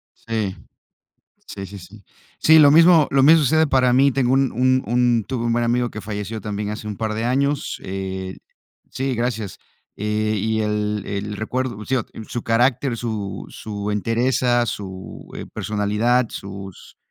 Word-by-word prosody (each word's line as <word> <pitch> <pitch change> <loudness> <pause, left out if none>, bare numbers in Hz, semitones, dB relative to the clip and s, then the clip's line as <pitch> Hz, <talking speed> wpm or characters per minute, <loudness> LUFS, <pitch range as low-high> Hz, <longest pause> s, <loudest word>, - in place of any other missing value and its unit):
Sí, 110 -4 -3 0.9
sí, 95 - -7
sí, 100 +2 -9
sí. 100 +3 -14 0.4
Sí, 160 0 +7
lo 145 -2 +8
mismo 165 0 +6
lo 135 -1 +4
mismo 160 +3 +7
sucede 160 +3 +3
para 130 -3 +3
mí. 140 +2 +5
Tengo 130 -1 +1
un 135 -1 +2
un 130 +2 +2
un 120 -2 +2
tuve 120 -2 -2
un 115 - +1
buen 120 0 +1
amigo 120 +1 +1
que 110 - -7
falleció 105 +1 -5
también 105 +1 -4
hace 105 0 -6
un 105 - -5
par 110 -1 -2
de 110 +2 -2
años, 140 +3 0
eh, 95 0 -5 0.5
sí, 135 -1 -2
gracias, 115 -4 -3 0.4
eh, 105 +1 -1
y 110 +2 0
el 105 -1 -1
el 105 +1 -4
recuerdo 120 -1 -3
sigo, 130 -3 0 0.2
su 120 - -4
carácter, 120 +2 +1
su 110 -4 -4
su 105 -1 -5
entereza, 120 +3 +1
su, 95 -4 -7
eh, - - -6
personalidad, 110 +4 +1
sus 95 -1 -9
115 Hz, 160 wpm, -21 LUFS, 105-125 Hz, 0.9 s, lo